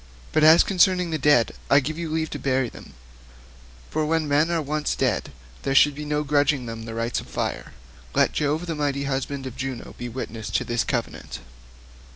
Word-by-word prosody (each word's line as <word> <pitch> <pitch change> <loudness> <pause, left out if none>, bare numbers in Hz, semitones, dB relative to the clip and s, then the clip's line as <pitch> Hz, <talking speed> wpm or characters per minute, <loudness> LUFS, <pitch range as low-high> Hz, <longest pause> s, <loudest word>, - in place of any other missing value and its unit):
But 155 - +2
as 160 +2 +8
concerning 180 -2 +2
the 155 - -1
dead, 130 -5 +4 0.2
I 140 - +7
give 150 +3 -3
you 170 -2 -3
leave 160 0 -2
to - - -4
burn 130 -2 0
them, - - -13 1.0
for 155 - 0
when 160 0 0
men 150 +3 +3
are 170 -1 +1
once 150 0 -1
dead - - 0 0.3
there 135 0 -1
should 145 +1 +6
be 150 +2 -7
no 150 0 0
grudging 145 -2 +2
them 115 -1 -6
the 115 0 -6
rites 115 +1 -1
of - - -10
fire. - - -3 0.4
Let - - +3
Jove 150 +3 0
the 170 - -3
mighty 145 -2 -1
husband 135 0 -3
of 130 -2 -6
Juno 130 -2 -5
be 120 - -4
witness 115 -3 -6
to - - 0
this 120 -1 0
covenant." - - -4
145 Hz, 195 wpm, -24 LUFS, 130-155 Hz, 1.0 s, as